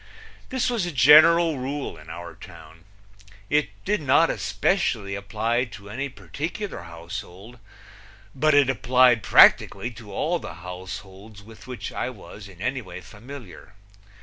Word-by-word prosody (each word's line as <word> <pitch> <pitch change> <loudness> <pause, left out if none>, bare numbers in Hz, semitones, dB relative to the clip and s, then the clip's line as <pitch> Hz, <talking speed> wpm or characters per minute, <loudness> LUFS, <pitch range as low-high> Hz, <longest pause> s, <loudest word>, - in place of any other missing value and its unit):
This 260 -1 -1
was 230 -8 -1
a - - -4
general 155 +3 +6
rule 135 -1 -4
in 80 0 -14
our 85 +2 -8
town. 80 +1 -14 0.7
It 150 -7 +2 0.2
did 210 -4 0
not 145 +4 +3
especially 115 - -1
apply 110 +5 -1
to 100 -3 -12
any 135 +5 -4
particular 165 - -6
household, 95 +6 -9 0.7
but 155 +3 +2
it 145 -3 +5
applied 125 -2 +3
practically 120 +3 +5
to 115 -3 -12
all 170 +3 -1
the 80 - -9
households 95 +3 -9
with 110 +1 -15
which 120 -6 -6
I - - -3
was 100 -3 -12
in 95 -1 -11
any 130 +2 -1
way 90 -5 -10
familiar. 105 - -12
120 Hz, 140 wpm, -24 LUFS, 100-145 Hz, 0.7 s, general